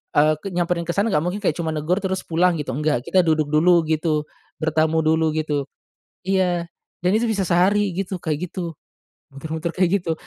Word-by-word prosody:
eee, 155 +1 +4
ke - - -4
nyamperin 175 -1 0
ke - - 0
sana 200 +3 +2
gak 150 +1 +2
mungkin 180 +4 -2
kayak 170 -6 0
cuma 160 -2 -2
negur 155 +5 0
terus 190 0 -1
pulang 175 +1 +2
gitu, 140 -3 -3
enggak. 150 -4 +1
Kita 185 -1 +4
duduk 155 -2 +1
dulu 170 +2 +4
gitu, 155 -1 0 0.3
bertamu 160 0 +1
dulu 160 0 +2
gitu. 150 -3 -1 0.6
Iya, 180 -2 0 0.4
dan 180 - +3
itu 235 - 0
bisa 200 -3 0
sehari 195 +3 +3
gitu, 195 0 -3
kayak 160 +3 -2
gitu, 170 -4 -5 0.6
muter-muter 160 +4 -4
kayak 185 +1 +2
gitu. 165 -2 -1
170 Hz, 185 wpm, -22 LUFS, 155-180 Hz, 0.6 s, eee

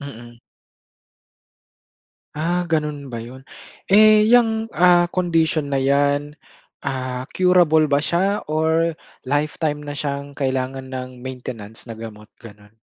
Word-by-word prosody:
Mm. 120 -4 -10 2.0
Ah, 175 +4 -1
gano'n 150 -3 -2
ba 120 - -5
'yon? 120 +3 -10 0.5
Eh, 215 +1 +7
'yang 225 -2 +3
ah, 175 -2 +4
condition 165 -4 0
na 135 -1 -1
'yan, 145 +2 +1 0.4
ah, 130 -1 -4
curable 175 -4 +4
ba 140 - +4
siya? 185 +7 0
Or 160 +2 +1 0.3
lifetime 150 +1 -1
na 145 0 -6
siyang 140 -1 -5
kailangan 130 -1 -3
ng 130 0 -5 0.2
maintenance 120 -3 -8
na 110 - -8
gamot, 105 -2 -10
gano'n. 105 -2 -15
145 Hz, 115 wpm, -21 LUFS, 130-165 Hz, 2.0 s, Eh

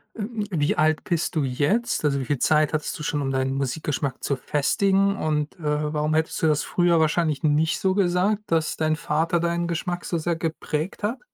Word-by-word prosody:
ähm, 220 0 -4
wie 150 -4 +1
alt 155 0 +2
bist 170 -2 -1
du 155 - +2
jetzt? 150 - 0
Also 140 -2 +2
wie 130 - -3
viel 145 +1 0
Zeit 155 0 +3
hattest 155 - -2
du 150 - -6
schon, 150 0 -1
um 135 -1 -1
deinen 130 0 0
Musikgeschmack 135 0 -2
zu 140 - 0
festigen? 195 +9 +1
Und, 150 -3 -1
äh, 150 0 -1
warum 150 +1 0
hättest 160 0 0
du - - +5
das 150 -1 +2
früher 175 -2 +2
wahrscheinlich 155 -2 +1
nicht 155 +2 +2
so 190 0 +1
gesagt, 195 +2 +1
dass 160 -2 +1
dein 155 0 +1
Vater 160 +3 0
deinen 170 0 0
Geschmack 175 +1 -3
so 170 - -1
sehr 170 +1 -1
geprägt 160 +2 -3
hat? 230 +5 -1
155 Hz, 200 wpm, -24 LUFS, 150-175 Hz, -, du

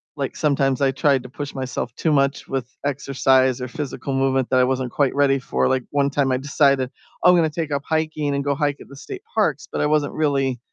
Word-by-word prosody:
like, 140 -2 -3
sometimes 140 -3 +1
I 135 -1 +3
tried 135 -1 +2
to - - -10
push 145 +1 -7
myself 130 -1 -4
too 160 - 0
much 140 -1 +1
with 130 -3 -3 0.2
exercise 130 -2 +2
or 125 - -4
physical 140 0 -5
movement 135 -1 +1
that 130 - +4
I - - +5
wasn't 130 -1 -1
quite 140 -2 +1
ready 135 -1 +3
for, - - 0
like, 130 -1 +1
one 140 -1 +2
time 140 -2 +1
I 130 - +2
decided, 140 -1 +2 0.3
"Oh, 180 - +8
I'm - - +5
gonna 160 -2 +3
take 155 -1 -4
up 140 0 -1
hiking 155 -2 -1
and 140 - -1
go 140 0 +1
hike 145 -1 0
at - - -12
the 140 - -13
state 385 - -9
parks," - - 0
but - - -2
I 150 - +2
wasn't 150 -1 +1
really 135 -5 0
140 Hz, 235 wpm, -22 LUFS, 130-145 Hz, 0.3 s, Oh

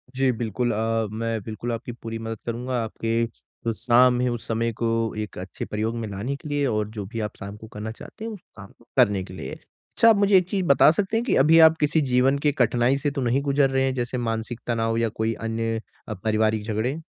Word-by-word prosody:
जी, 135 0 +3
बिल्कुल 120 +1 -1
अ, 115 0 0
मैं 115 0 -2
बिल्कुल 110 +3 -5
आपकी 115 +1 -4
पूरी 115 -1 -6
मदद 115 0 -5
करूँगा। 120 +1 -2
आपके, 115 +1 -1
जो 115 0 -7
शाम 125 +2 +4
है 125 - +1
उस 120 -1 -4
समय 115 +1 0
को 115 - +2 0.3
एक 105 0 -5
अच्छे 90 0 -6
प्रयोग 110 +2 -2
में 115 -1 -3
लाने 105 +8 -3
के 150 - -9
लिए 145 -1 0
और 105 -4 0
जो 105 -2 -6
भी 115 +4 -6
आप 105 -1 -4
शाम 100 +1 -7
को 110 - -11
करना 105 +1 -5
चाहते 215 - -10
हैं 230 - -4
उस 210 - -8 0.2
काम 100 -2 -11
को - - -24
करने 100 -2 +4
के 90 - -11
लिए। - - -6
अच्छा 230 - 0
आप 225 - +6
मुझे 200 0 +4
एक 180 -1 +2
चीज़ 190 -2 -1
बता 140 -1 +6
सकते 200 +6 0
हैं 230 - 0
की 250 - +2
अभी 160 +4 +6
आप 160 0 +7
किसी 150 +2 +2
जीवन 130 +2 +4
के 145 - +5
कठिनाई 125 -1 +2
से 145 +1 -1
तो 140 -1 -3
नहीं 125 +2 +1
गुजर 140 -1 +2
रहे 135 0 +1
हैं 135 - 0
जैसे 125 0 -2
मानसिक 115 0 -3
तनाव 115 -1 0
या 115 0 +1
कोई 110 +1 -1
अन्य 115 0 -2 0.3
अ, 110 - -3
पारिवारिक 110 +1 0
झगड़े। 110 +7 -2
115 Hz, 240 wpm, -24 LUFS, 110-135 Hz, 0.3 s, आप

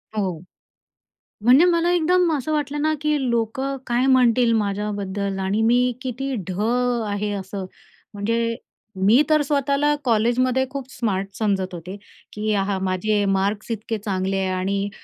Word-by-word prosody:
हो. 185 -6 -2 1.0
म्हणजे 260 +8 +6
मला 340 0 +2
एकदम 355 0 +3
असं 295 +4 -4
वाटलं 295 0 -1
ना, 310 0 +2
की 300 -1 +1
लोकं 235 +4 -1
काय 245 +2 +1
म्हणतील 250 -2 +4
माझ्याबद्दल 200 -2 -2
आणि 195 +3 0
मी 245 +2 +3
किती 265 +1 -3
ढ 185 +1 -4 0.5
आहे 205 0 -2
असं. 190 0 -6 0.5
म्हणजे, 230 +3 -1 0.5
मी 235 +8 +6
तर 305 -1 +4
स्वतःला 285 +1 +1
कॉलेजमध्ये 250 +3 +2
खूप 275 -1 -5
स्मार्ट 195 -5 -2
समजत 195 -4 -1
होते, 175 +3 -7 0.4
की 215 0 -1
हां, 195 -1 0
माझे 205 +3 0
मार्क्स 200 +4 -1
इतके 225 0 -3
चांगले 195 -2 -2
आहे 190 -1 0
आणि 200 +2 -1
225 Hz, 140 wpm, -22 LUFS, 200-265 Hz, 1.0 s, म्हणजे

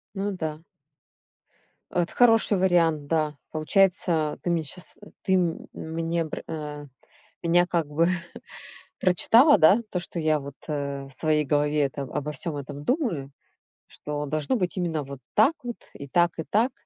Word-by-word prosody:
Ну 200 +1 -1
да. 160 -4 -5 1.3
Это 175 -1 -1
хороший 225 -4 +4
вариант, 165 -5 +2
да. 155 -2 0
Получается, 165 -1 +2
ты 175 - -2
мне 170 -2 +1
щас 175 +5 -9 0.3
ты 190 - 0
м 175 -3 0
мне 165 +1 -2
пр 155 - -6
а, 150 -2 -6 0.6
меня 175 +1 +4
как 170 -4 0
бы 165 +3 +2 0.9
прочитала, 225 - +5
да, 190 +9 +6
то 180 - -1
что 175 0 -6
я 155 -1 +2
вот, 140 0 -8
э, 140 -2 -3
в - - -14
своей 150 +2 +1
голове 150 +1 +1
это 140 0 -2
обо 150 +2 -4
всём 150 +2 -3
этом 145 +1 -7
думаю, 190 - -1 0.6
что 150 0 -5
должно 155 - -1
быть 185 -3 -2
именно 165 -4 -1
вот 140 -1 -9 0.2
так 225 +9 +5
вот, 240 -1 -4 0.2
и 140 - -9
так, 175 +4 +3
и 160 - -1
так. 230 +5 +2
160 Hz, 155 wpm, -26 LUFS, 150-180 Hz, 1.3 s, да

